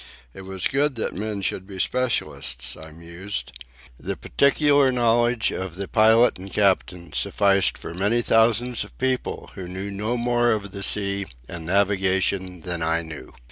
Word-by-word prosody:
It 95 - -10
was 95 -1 -4
good 140 0 +1
that 110 - -2
men 105 0 -4
should 95 0 -2
be 95 -2 -9
specialists, 65 - -1
I 80 0 -11
mused. 85 -4 -6 0.5
The - - -4
peculiar 140 -1 +3
knowledge 120 -1 +2
of 95 -3 -5
the 100 +1 -5
pilot 110 0 +4
and 95 +1 -9
captain 90 -5 0
sufficed 100 -1 +2
for - - -8
many 105 +7 +1
thousands 115 +2 +2
of - - -15
people 130 -1 -2
who 95 -2 -7
knew 95 +3 -5
no 105 +5 -2
more 120 0 +2
of 100 -2 -4
the 100 - -7
sea 100 -1 +1 0.2
and 80 -1 -8
navigation 95 -1 +1
than 85 0 -3
I 80 +1 0
knew. 80 -2 -9
100 Hz, 160 wpm, -23 LUFS, 90-120 Hz, 0.5 s, pilot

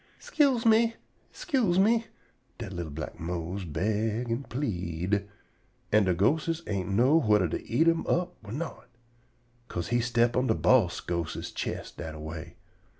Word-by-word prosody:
"'Scuse 270 -6 +2
me! 230 +1 +4 0.4
'Scuse 240 - 0
me!" 225 +4 +3 0.5
dat 110 -5 -6
li'l 85 -3 -4
black 75 +1 -7
Mose 90 +3 -4
beg 110 +8 -1
an' 120 +4 -1
pleed, 100 - -2 0.6
an' 105 -1 +5
de 90 -2 +2
ghostes 160 - +1
ain't 95 -3 -2
know 125 +11 +4
whuther 105 - +3
to 80 - -4
eat 150 +9 +3
him 165 0 +2
all 175 - +3
up 180 - -9
or 105 - -9
not, 150 0 -5 0.8
'ca'se 85 - -4
he 120 - +2
step 120 0 +2
on 125 +1 +2
de - - +2
boss - - +3
ghostes's 85 -2 -3
chest - - -5
dat 80 -1 -6
a - - -9
way. 80 0 -7
110 Hz, 160 wpm, -28 LUFS, -, 0.8 s, an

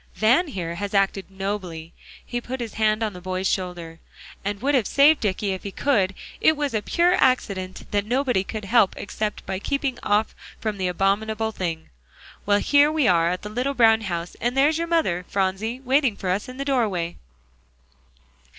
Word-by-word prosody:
"Van, 250 +11 +3
here, 180 - -4
has 200 +3 -4
acted 195 -1 +1
nobly" 190 -4 -5 0.3
he 240 0 -3
put 260 +2 -5
his 235 -3 -5
hand 215 0 +1
on 215 -2 -2
the 180 - -10
boy's 185 +1 -2
shoulder 175 -4 -3 0.4
"and 200 0 -3
would 280 +6 0
have 250 -7 +2
saved 290 +2 +5
Dicky 205 -1 -1
if 190 - -4
he 200 - -5
could. 200 -4 +1 0.2
It 315 - +4
was 290 -3 -1
a 215 - 0
pure 345 +10 +2
accident 195 -8 0
that 205 0 0
nobody 250 -5 +1
could 215 +1 -6
help 215 -1 +3
except 210 +1 -4
by 190 0 -3
keeping 275 +2 -2
off 210 +1 +1 0.3
from 215 -3 -3
the 185 - 0
abominable 215 +4 0
thing. 165 -6 -4 0.6
Well, 205 0 +4
here 290 +6 +4
we 310 -6 +2
are 170 -1 +4
at 180 +1 -3
the 210 - -5
little 250 +6 -2
brown 225 -2 +5
house; 175 -4 -4
and 245 +3 -1
there's 300 +4 +3
your 335 - -1
mother, 315 - +1
Phronsie, 200 +5 -1
waiting 265 -4 +2
for 185 - -4
us 200 +6 -2
in 255 - -9
the 275 - -3
doorway." 210 -11 0
210 Hz, 185 wpm, -24 LUFS, 190-255 Hz, 0.6 s, saved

